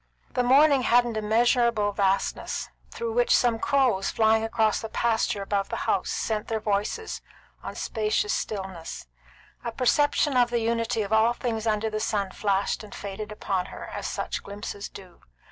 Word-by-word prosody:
The - - +1
morning 275 +2 +5
had 245 0 +4
an 235 -2 -4
immeasurable 225 0 +2
vastness, 195 -1 -1 0.2
through 465 -1 -4
which - - +4
some 235 -3 +2
crows 255 -9 +2
flying 220 0 +3
across 220 -1 +1
the 225 - -5
pasture 220 -3 0
above 195 0 -1
the - - -3
house - - +1
sent 215 -2 -2
their 220 -1 -1
voices 215 - -2 0.4
on - - -6
the - - -8
spacious 215 -1 0
stillness. 190 -5 -5 0.6
A 235 - -3
perception 290 +3 +2
of 245 -1 +4
the 240 - 0
unity 230 0 0
of 200 +2 -3
all 220 +2 +4
things 230 -2 -3
under 220 0 0
the 215 - -2
sun 200 -3 -1
flashed 200 +1 0
and 210 - -10
faded 205 +2 -6
upon 190 -3 -2
her, - - -9
as - - -4
such - - -3
glimpses 200 0 -7
do. 185 -3 -13
220 Hz, 170 wpm, -26 LUFS, 205-240 Hz, 0.6 s, morning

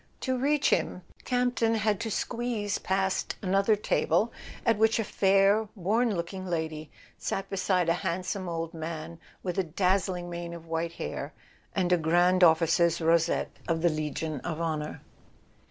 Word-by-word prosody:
To 260 -1 0
reach 285 +3 +2
him 180 - 0 0.2
Camp 250 -1 +1
ton 230 0 +2
had 215 -2 +1
to 230 - -3
squeeze 220 -2 -2
past 190 0 0
another 195 +3 +3
table, 215 +2 +1 0.3
at 225 -2 +3
which 220 +1 +4
a 225 - +1
fair 200 +2 +3
worn 215 +4 +1
looking 175 +2 -4
lady 160 -3 -3 0.3
sat 195 - -3
beside 185 -2 +1
a 170 - +4
handsome 185 +1 -2
old 165 -1 -3
man 160 0 -6 0.2
with 180 0 -2
a - - +3
dazzling 180 +1 0
mane 170 0 -5
of 165 -1 -11
white 165 0 -2
hair - - -5 0.4
and 180 -2 +2
a - - +5
Grand 175 +3 +3
Of¬ 165 -2 +7
ficer's 170 0 +2
rosette 165 0 +2 0.2
of 165 -1 0
the 175 - +5
Legion 155 -1 -3
of 160 +3 -4
Honour. 155 -2 -3
180 Hz, 160 wpm, -28 LUFS, 165-205 Hz, 0.4 s, Of¬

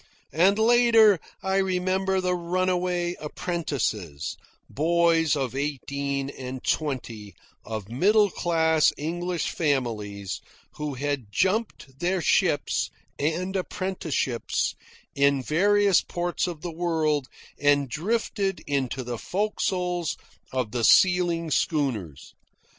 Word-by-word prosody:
And, 190 +6 +4
later, 225 -3 +5 0.2
I 190 0 +1
remember 190 0 +1
the 180 -1 0
runaway 180 0 0
apprentices 135 - -3 0.3
boys 165 0 +2
of 135 -3 -2
eighteen 140 -1 -2
and 130 -1 -7
twenty, 120 -9 -3 0.3
of 110 -3 -5
middle 200 - +3
class 160 -2 +2
English 175 +3 -2
families, 105 - -2 0.4
who 150 -2 -3
had 135 -5 -3
jumped 185 - -1
their 180 +2 0
ships 165 - +1 0.3
and 175 +6 -1
apprenticeships 180 - -2 0.4
in 140 -1 +2
various 200 +6 +3
ports 175 +1 -2
of 170 -4 -6
the 175 0 -5
world 160 -5 0 0.3
and 145 -1 +3
drifted 195 - -1
into 135 -2 -1
the 120 -2 -5
forecastles 180 -4 -1 0.3
of 125 -5 -2
the 120 -2 -2
sealing 175 0 +4
schooners. 115 - -1
160 Hz, 105 wpm, -26 LUFS, 135-185 Hz, 0.4 s, later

